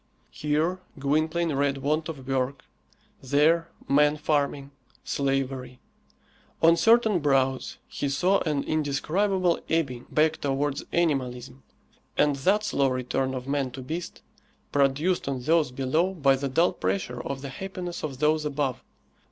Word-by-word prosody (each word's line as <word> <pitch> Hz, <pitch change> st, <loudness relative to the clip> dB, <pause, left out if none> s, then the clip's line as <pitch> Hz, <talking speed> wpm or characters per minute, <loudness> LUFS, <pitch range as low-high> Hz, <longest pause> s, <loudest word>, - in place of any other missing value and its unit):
Here 155 Hz, +5 st, 0 dB, 0.2 s
Gwynplaine 155 Hz, +4 st, 0 dB
read 140 Hz, 0 st, +1 dB
want 155 Hz, +4 st, -1 dB
of 135 Hz, -5 st, -8 dB
work; 135 Hz, 0 st, -1 dB, 0.6 s
there 155 Hz, +5 st, +2 dB, 0.2 s
man 150 Hz, +2 st, +4 dB
farming, 145 Hz, -2 st, -1 dB, 0.3 s
slavery. 135 Hz, -2 st, -2 dB, 0.8 s
On 165 Hz, +1 st, +7 dB
certain 225 Hz, -1 st, +4 dB
brows 135 Hz, -3 st, +1 dB
he 140 Hz, -, -3 dB
saw 180 Hz, +8 st, +2 dB
an 150 Hz, -4 st, -1 dB
indescribable 170 Hz, +5 st, 0 dB
ebbing 135 Hz, -7 st, -1 dB
back 155 Hz, +1 st, +2 dB
towards 140 Hz, 0 st, -1 dB
animalism, 135 Hz, -6 st, -1 dB, 0.6 s
and 145 Hz, -1 st, +3 dB
that 195 Hz, +10 st, +2 dB
slow 140 Hz, -9 st, +1 dB
return 130 Hz, +1 st, -1 dB
of 130 Hz, 0 st, -6 dB
man 140 Hz, -2 st, 0 dB
to 130 Hz, -, -7 dB
beast, 165 Hz, +6 st, -6 dB, 0.5 s
produced 145 Hz, +6 st, +1 dB
on 130 Hz, -2 st, -3 dB
those 160 Hz, 0 st, +3 dB
below 155 Hz, +9 st, 0 dB
by 140 Hz, -5 st, +4 dB
the 135 Hz, +1 st, -3 dB
dull 165 Hz, +7 st, +3 dB
pressure 100 Hz, +6 st, -2 dB
of 135 Hz, +1 st, -5 dB
the 140 Hz, -, -5 dB
happiness 180 Hz, +3 st, -6 dB
of 140 Hz, -4 st, -4 dB
those 155 Hz, +2 st, +2 dB
above. 140 Hz, -3 st, -2 dB
145 Hz, 135 wpm, -26 LUFS, 135-160 Hz, 0.8 s, On